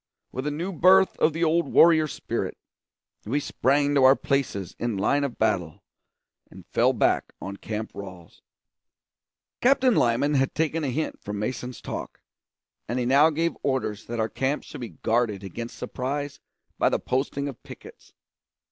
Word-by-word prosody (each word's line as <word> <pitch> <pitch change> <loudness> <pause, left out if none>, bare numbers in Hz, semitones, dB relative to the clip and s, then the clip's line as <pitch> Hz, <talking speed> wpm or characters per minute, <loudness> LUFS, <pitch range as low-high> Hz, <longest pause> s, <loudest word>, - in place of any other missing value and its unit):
With 130 +3 -4
a - - +2
new 170 +6 -4
birth 185 +4 +5
of 160 - +4
the 165 +2 -2
old 165 +1 +2
warrior 160 -2 +6
spirit, - - -4 0.7
we 135 +7 0
sprang 145 +1 +1
to 140 -2 +4
our 130 +1 +8
places 125 - -2
in 120 -4 -1
line 140 +9 +2
of 140 -4 -3
battle 95 -8 -1 0.7
and - - -14
fell - - +2
back - - +1
on 100 +1 -6
Camp 110 +1 -5
Ralls. 95 -4 -10 1.2
Captain 260 0 +4
Lyman 125 - +2
had 135 -1 +1
taken 160 0 0
a - - 0
hint 155 +5 -3
from 105 0 -5
Mason's 125 +3 -4
talk, - - -6 0.7
and 120 - -2
he 125 - 0
now 140 +5 +5
gave 165 +2 0
orders 115 -6 -2
that 120 0 -4
our 110 - +1
camp 135 +5 -2
should - - -10
be 120 - -5
guarded 110 -4 +1
against 115 +5 -7
surprise 140 +2 -4 0.4
by - - +4
the - - +1
posting 140 +2 -2
of 135 - -8
pickets. - - -13
135 Hz, 165 wpm, -25 LUFS, 115-150 Hz, 1.2 s, our